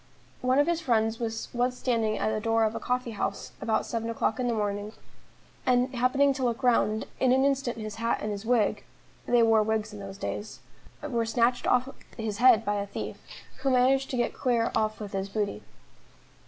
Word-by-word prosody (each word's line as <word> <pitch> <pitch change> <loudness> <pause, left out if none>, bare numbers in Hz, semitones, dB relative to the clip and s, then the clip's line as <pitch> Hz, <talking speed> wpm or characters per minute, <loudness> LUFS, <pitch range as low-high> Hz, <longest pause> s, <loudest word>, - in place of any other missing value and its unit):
One 255 +1 +2
of 290 - +5
his 340 0 0
friends 225 -5 +1
was 225 -1 -3
once 250 +1 0
standing 225 -4 0
at 215 - 0
the 215 - -1
door 225 +1 +2
of 215 0 +1
a - - -4
coffee 250 -1 -2
house 200 -1 -3
about 220 -1 0
seven 230 0 -3
o'clock 230 0 -1
in 250 - 0
the 235 - 0
evening, 205 0 -2 0.7
and 250 0 +2
happening 260 +3 +3
to 265 -1 -4
look 240 +1 -1
round, 220 -3 +2
in 255 - +3
an 265 +1 +4
instant 275 -4 0
his 215 -1 -6
hat 230 +1 0
and 210 - -3
his 200 0 -5
wig 225 -3 +1 0.4
they 240 -1 +4
wore 225 -1 +5
wigs 215 0 -1
in 210 - -8
those 195 -1 -8
days 205 +1 -5 0.4
were 240 -6 0
snatched 235 +2 +1
off 250 +1 +3 0.3
his 220 -2 -3
head 240 -3 +6
by 205 0 0
a 200 0 -3
thief, - - -6 0.4
who 270 +1 -1
managed 265 +1 +3
to 255 - -2
get 240 - 0
clear 240 -3 0
off 215 0 0
with 205 -2 -6
his 195 0 -2
booty. 205 0 -2
230 Hz, 205 wpm, -28 LUFS, 215-250 Hz, 0.7 s, head